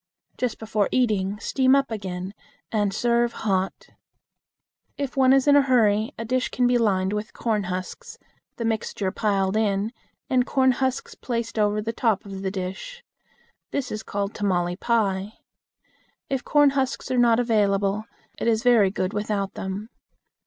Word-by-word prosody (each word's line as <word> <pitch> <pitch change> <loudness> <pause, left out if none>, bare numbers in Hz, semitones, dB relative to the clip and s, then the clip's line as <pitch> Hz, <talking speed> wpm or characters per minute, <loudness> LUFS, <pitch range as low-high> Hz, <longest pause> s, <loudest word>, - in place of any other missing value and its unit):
Just 250 -3 -2
before 215 -2 -1
eating, 210 -5 +1
steam 260 +4 +2
up 275 -3 +1
again, 190 -3 -5 0.4
and 205 -3 +1
serve 235 +2 +1
hot. 195 -3 -2 1.1
If 280 -2 -4
one 260 -1 +5
is 270 +1 +4
in 285 - +7
a 285 - +7
hurry, 225 -3 +2
a 230 - -4
dish 255 +2 0
can 250 - 0
be 245 0 +3
lined 195 -3 +1
with 210 +1 -4
corn 215 -4 -1
husks, 185 - -6 0.4
the 230 - -4
mixture 220 -3 -1
piled 195 -2 0
in, 210 0 0 0.3
and 255 -1 +3
corn 260 0 +3
husks 260 +1 -2
placed 230 -2 -4
over 210 0 +1
the 225 +1 -3
top 220 -4 0
of 195 -1 -7
the 195 - -1
dish. 195 - -6 0.7
This 275 -2 -3
is 215 - -3
called 200 -1 -3
"tamale 180 -4 0
pie." 205 -2 0 1.0
If 270 -1 -1
corn 290 -1 +4
husks 265 -1 -2
are 255 - +2
not 235 -1 +4
available, 205 -3 +1 0.3
it - - -1
is 225 0 +2
very 235 -6 +5
good 185 0 -2
without 205 -2 -2
them. 195 +3 -5
220 Hz, 160 wpm, -24 LUFS, 200-245 Hz, 1.1 s, in